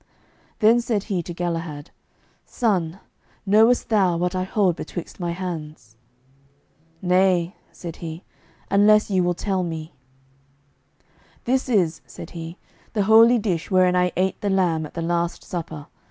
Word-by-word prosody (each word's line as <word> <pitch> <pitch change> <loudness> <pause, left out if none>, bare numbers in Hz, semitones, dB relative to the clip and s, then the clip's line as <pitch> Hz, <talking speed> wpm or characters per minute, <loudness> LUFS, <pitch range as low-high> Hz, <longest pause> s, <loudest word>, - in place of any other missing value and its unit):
Then 230 +1 +4
said 225 -4 -1
He 195 -5 -2
to 170 - -8
Galahad, 165 -4 -4 0.5
"Son, 190 -7 -1 0.5
knowest 220 +5 +4
thou 190 -6 +3
what 180 +1 -1
I 185 - -1
hold 190 -3 +1
betwixt 175 +1 -7
my 175 -1 -2
hands?" 160 - -6 1.1
"Nay," 180 0 +2 0.2
said 170 -2 -8
he, 165 +1 -7 0.5
"unless 210 +1 +4
ye 190 -1 +3
will 175 0 +1
tell 190 0 -1
me." 165 -2 -5 1.5
"This 260 +2 0
is," 180 -9 +1
said - - -10
He, 165 +1 -8 0.4
"the 210 -2 +1
holy 225 +4 +6
dish 190 -7 -2
wherein 185 -1 +3
I 180 0 +2
ate 190 +1 0
the 205 - -1
lamb 175 -5 +1
at - - -20
the 165 - -3
Last 170 0 -1
Supper. 160 -4 -6
180 Hz, 140 wpm, -23 LUFS, 170-205 Hz, 1.5 s, holy